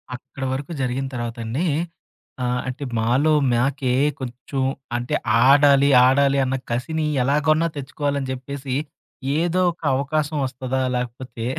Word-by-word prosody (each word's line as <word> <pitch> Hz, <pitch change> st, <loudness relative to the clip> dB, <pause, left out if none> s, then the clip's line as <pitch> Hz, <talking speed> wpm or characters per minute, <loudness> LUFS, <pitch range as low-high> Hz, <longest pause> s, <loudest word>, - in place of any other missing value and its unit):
అక్కడ 135 Hz, +2 st, -9 dB
వరకు 140 Hz, +4 st, -5 dB
జరిగిన 130 Hz, +1 st, -1 dB
తర్వాత 120 Hz, -1 st, -4 dB
అండి. 130 Hz, +11 st, -1 dB, 0.8 s
ఆహ్, 125 Hz, 0 st, 0 dB
అంటే 130 Hz, +3 st, -5 dB, 0.2 s
మాలో 130 Hz, +8 st, +2 dB, 0.2 s
మాకే 125 Hz, +1 st, +1 dB, 0.3 s
కొంచెం 130 Hz, +1 st, -5 dB, 0.4 s
అంటే 120 Hz, 0 st, -2 dB, 0.3 s
ఆడాలి, 140 Hz, 0 st, +6 dB, 0.2 s
ఆడాలి 140 Hz, +1 st, +3 dB
అన్న 130 Hz, +1 st, -1 dB, 0.2 s
కసిని 155 Hz, +6 st, -1 dB, 0.2 s
ఎలాగొన్నా 155 Hz, +4 st, +2 dB
తెచ్చుకోవాలని 140 Hz, 0 st, -3 dB
జెప్పేసి, 130 Hz, 0 st, -5 dB, 0.6 s
ఏదో 175 Hz, +2 st, +1 dB
ఒక 165 Hz, -, -18 dB
అవకాశం 150 Hz, +2 st, -1 dB
వస్తదా, 130 Hz, 0 st, -3 dB
లేకపోతే 125 Hz, -1 st, -5 dB
135 Hz, 120 wpm, -22 LUFS, 125-145 Hz, 0.8 s, ఆడాలి